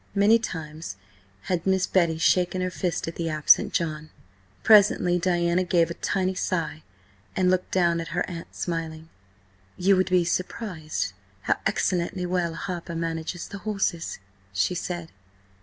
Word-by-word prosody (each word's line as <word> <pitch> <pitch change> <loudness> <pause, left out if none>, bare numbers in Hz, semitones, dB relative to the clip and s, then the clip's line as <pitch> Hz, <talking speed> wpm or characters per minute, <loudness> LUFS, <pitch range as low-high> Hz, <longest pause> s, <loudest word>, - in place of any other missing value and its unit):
Many 210 +3 +5
times 160 - -6 0.4
had 175 - -2
Miss 190 -1 +3
Betty 170 -4 +2
shaken 180 +2 +2
her 185 0 -1
fist 180 -2 -2
at 165 - -5
the 165 -1 -1
absent 155 -1 +4
John. 155 -2 -2 0.5
Presently 200 -4 +5
Diana 175 0 +2
gave 170 -2 +2
a - - -2
tiny 190 +1 -1
sigh, 165 -4 -2 0.5
and 185 -1 +3
looked 185 0 0
down 170 -2 +2
at 165 - -6
her 175 +1 -2
aunt, 170 -2 -8
smiling. 165 -2 -4 0.7
"You 195 +2 +4
would 185 +1 +1
be 180 -2 +3
surprised 175 - -3 0.3
how - - +1
excellently 180 +1 0
well 175 -2 -1
Harper 170 -1 -5
manages 165 +1 -3
the 200 - -8
horses," 195 -5 -2 0.3
she 95 - +1
said. 175 -1 -4
175 Hz, 145 wpm, -25 LUFS, 165-185 Hz, 0.7 s, Many